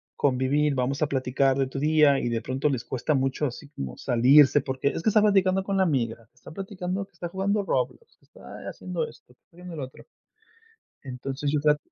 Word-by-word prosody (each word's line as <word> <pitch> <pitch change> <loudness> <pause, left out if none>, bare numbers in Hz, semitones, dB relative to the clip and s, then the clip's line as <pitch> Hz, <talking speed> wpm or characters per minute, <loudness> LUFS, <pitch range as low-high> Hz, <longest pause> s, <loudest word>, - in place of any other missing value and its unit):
convivir, 140 +2 +1
vamos 130 +3 -1
a 155 - +3
platicar 135 0 +1
de 135 -1 +1
tu 135 +1 -5
día". 150 -2 +4
Y - - -2
de 115 -1 -1
pronto, 130 +5 -1
les 130 -4 -2
cuesta 130 +4 -1
mucho 135 +2 0
así 140 +3 -9
como 70 - -7
salirse 135 +4 +5
porque 130 +1 -1
es 165 - -5
que - - +3
está 215 0 +4
platicando 195 -2 +3
con 195 0 -2
la 190 - +4
amiga, 115 -8 -1
está - - -14
platicando, 190 +1 -4
que 200 - -35
está 175 +1 -6
jugando 200 +3 0
Roblox, 465 - -3
que - - -30
está - - -10
haciendo 480 - -4
esto, - - -17
que - - -59
está 170 - -27
viendo 180 -1 -9
lo 145 -4 -4
otro. 130 - -15 1.0
Entonces 135 +2 -4
yo 150 - +1
trat 150 0 +3
145 Hz, 210 wpm, -26 LUFS, 130-180 Hz, 1.0 s, salirse